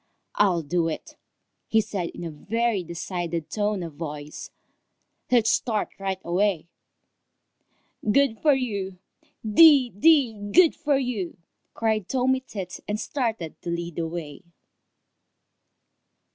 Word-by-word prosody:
"I'll 180 -5 +2
do 165 +3 0
it!" 160 - -6 0.6
said 205 -4 -2
he - - -4
in - - -6
a 165 - -4
very 215 +5 -1
decided 170 -1 -4
tone 205 -3 -1
of 165 -2 -7
voice. 150 -1 -7 0.8
"Let's 240 -3 +4
start 220 -4 0
right 195 -1 -2
away." 175 -1 0 1.4
"Good 275 -3 +3
for 295 -3 +4
you! 200 -8 -3 0.5
Dee, 270 +2 +7
dee, 275 - +4 0.2
good 350 -2 +6
for 295 -4 +1
you!" 235 -9 -3 0.4
cried 220 -4 0
Tommy 260 0 +2
Tit, 195 -8 -7
and 210 +1 -2
started 225 - -3
to - - -5
lead 170 -1 -4
the 165 -1 -1
way. 160 -3 -7
200 Hz, 120 wpm, -25 LUFS, 170-245 Hz, 1.4 s, Dee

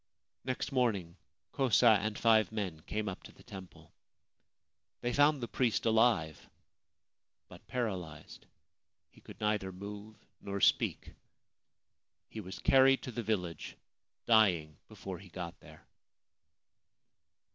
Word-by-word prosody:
Next 130 +3 -3
morning 105 -10 0 0.4
Kosa 120 -4 +4
and 105 +1 -3
five 110 -2 +4
men 100 -7 -4
came 105 0 -2
up 95 - -5
to - - -13
the - - -19
temple. 95 -2 -12 1.1
They 120 0 -1
found 145 0 +4
the - - -2
priest 120 -2 0
alive 110 -9 +2 1.0
but - - -15
paralysed. 95 -11 -5 0.6
He - - -20
could - - -13
neither 105 -3 0
move 105 +3 -9 0.3
nor 100 0 -4
speak. - - +1 1.2
He 110 - -7
was 95 -2 -7
carried 135 0 +4
to 130 - -5
the 120 - -4
village, 90 -7 -3 0.5
dying 90 -9 +3
before 95 -2 -8
he 95 - -14
got 85 -1 -7
there. - - -16
105 Hz, 120 wpm, -32 LUFS, 95-120 Hz, 1.2 s, Kosa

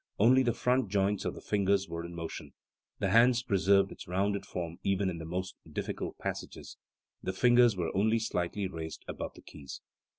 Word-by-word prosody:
Only 125 +5 +6
the 120 -2 +2
front 125 -3 +1
joints 100 0 +1
of - - -2
the - - -9
fingers 100 -1 +1
were 85 0 -5
in 85 0 -8
motion; 80 -3 -6 0.4
the 100 -2 0
hand 120 +2 +6
preserved 100 0 +3
its - - -10
rounded 100 +3 -1
form 85 -1 -5
even 100 -1 +1
in 85 - -6
tht 80 - -6
most 90 +2 -4
difficult - - -4
passages;, - - -6 0.4
the 95 - -2
fingers 120 +1 +5
were 85 -2 -2
only 110 +4 +3
slightly 100 -3 -1
raised 80 -3 -7
above - - -5
the - - -14
keys. 70 -2 -9
95 Hz, 185 wpm, -31 LUFS, 85-110 Hz, 0.4 s, Only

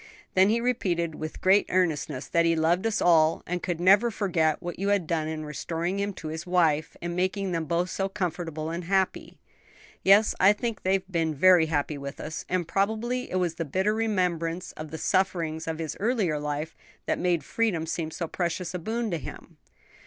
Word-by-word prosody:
Then 190 +1 +5
he 230 +2 +2
repeated, 185 -9 0
with 155 +1 -7
great 195 +2 +4
earnestness, 155 -6 0
that 170 - +2
he 165 0 +3
loved 170 +6 +2
us 220 - 0
all, 160 -2 +4
and 180 0 -3
could 175 -3 -3
never 200 +6 +5
forget 175 -8 0
what 175 0 -6
you 195 - -1
had 200 -4 +2
done 155 -1 -1
in 155 -1 -4
restoring 165 +5 -3
him 200 +1 -1
to 160 -4 -7
his 160 +3 -6
wife, 160 -4 +1
and 175 0 -3
making 185 +1 -1
them 165 -2 -1
both 175 +3 -1
so 195 0 -1
comfortable 165 -5 -3
and 170 +1 -4
happy." 190 +1 -1 0.6
"Yes, 200 +3 +5
I 195 +2 +6
think 225 +1 -4
they 190 - +1
have 190 0 -1
been 165 -3 0
happy 160 -5 +4
with 140 +1 -7
us; 155 +2 -6
and 180 -2 0
probably 220 +7 -1
it - - -4
was 180 -3 +1
the 165 - -3
bitter 190 +8 0
remembrance 180 -6 -1
of 155 0 -8
the 160 - -6
sufferings 165 -4 0
of 160 -1 -2
his 160 -2 -4
earlier 205 -9 +1
life 150 +2 -4 0.3
that - - -1
made 175 -4 +1
freedom 195 -4 0
seem 165 -1 -3
so 165 +1 -4
precious 175 +1 -3
a 180 - -3
boon 225 +4 -2
to 170 - -1
him." 130 - -10
175 Hz, 195 wpm, -27 LUFS, 160-195 Hz, 0.6 s, I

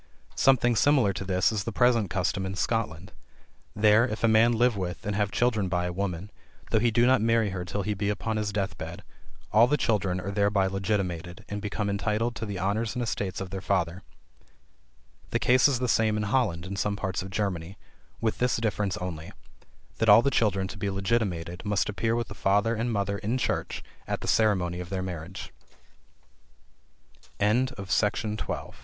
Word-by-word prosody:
Something 120 -3 +3
similar 125 -5 +3
to 95 - -5
this 95 +1 +2
is 105 -2 -2
the 115 - -4
present 115 -3 +3
custom 95 +1 -1
in 95 0 -4
Scotland. 100 -4 -2 0.6
There, 105 +2 +5
if 110 -1 -5
a - - +5
man 110 +2 +5
live 120 0 +3
with, 90 -2 -4
and 105 0 -1
have 105 -1 +1
children 110 -5 +1
by 90 0 0
a 90 - -3
woman, 95 0 -3 0.4
though 110 - +4
he 120 +2 +3
do 115 +2 +3
not 130 -3 +4
marry 115 -2 +2
her 90 -1 -4
till 100 +3 -3
he 105 +2 -1
be 100 0 -2
upon 110 +1 -2
his 105 -1 -1
death 95 -5 -3
bed, 80 +2 -7 0.5
all 110 +4 +6
the 150 +3 +2
children 100 -7 0
are 100 +2 -4
thereby 100 -1 +2
legitimated 95 -3 -2
and 105 0 -4
become 105 0 -2
entitled 105 +4 -1
to 110 - -4
the 100 -2 -4
honors 105 +5 -1
and 125 - -1
estates 100 -4 -3
of 95 -2 -6
their 95 0 -4
father. 90 -2 -1 1.3
The - - +1
case 130 +3 +4
is 140 -3 +1
the 125 +1 -1
same 110 -2 +2
in 105 - -1
Holland 100 -7 0
and 100 +1 -5
some 105 -1 0
parts 95 -2 -3
of 95 - -7
Germany; 95 -3 -3 0.4
with 110 -1 -1
this 125 0 +2
difference 105 -3 -1
only, 85 -5 -6 0.7
that 115 - +2
all 105 +3 +8
the 140 - +2
children 100 -6 +1
to 100 - -8
be 100 - -1
legitimated 95 -4 -1
must 105 -4 0
appear 110 +3 0
with 120 -1 -2
the - - -7
father 105 +4 +2
and 120 +2 -1
mother 100 -1 -1
in 110 +5 -1
church 130 - -2 0.2
at - - -2
the - - -6
ceremony 95 -5 +2
of 90 -1 -6
their 95 -1 -2
marriage. 90 0 -7 1.8
FEMALE 125 +5 +1
FRIENDSHIP. 105 +2 -1
105 Hz, 190 wpm, -27 LUFS, 95-115 Hz, 1.8 s, all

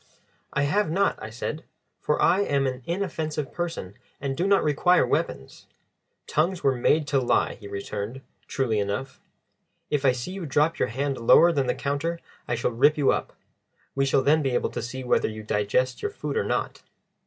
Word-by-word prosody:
"I 140 - 0
have 190 +6 +1
not," 195 +5 +1
I - - -6
said, 125 +7 -5 0.4
"for 150 - 0
I 185 - +4
am 140 -8 +1
an 130 -1 -2
inoffensive 160 -5 -3
person 165 - -4 0.3
and 135 -1 -3
do 180 +7 0
not 200 0 +4
require 155 +4 +3
weapons." 65 - -3 0.6
"Tongues 170 +4 0
were 135 - +4
made 150 +5 +2
to 140 - +3
lie," 125 - +1
he 105 - -11
returned, 100 +5 -5 0.3
truly 130 -7 0
enough. 100 +7 -3 0.7
"If 145 -2 +1
I 135 - +5
see 125 +7 -5
you 190 -4 -5
drop 150 +4 +1
your - - +2
hand 135 +3 -2
lower 165 +9 +6
than 140 -5 0
the 125 - +1
counter 145 +5 -2 0.3
I 120 - 0
shall 120 +1 -1
rip 140 +6 +3
you 145 -2 +4
up. - - -2 0.6
We 135 0 +1
shall 135 0 +2
then 155 +3 +4
be 135 -4 0
able - - 0
to - - -4
see 130 +2 -6
whether 125 - +2
you 110 0 -7
digest 105 +5 0
your 420 - -1
food 415 - -5
or 455 - +1
not." - - -2
140 Hz, 190 wpm, -25 LUFS, 125-160 Hz, 0.7 s, lower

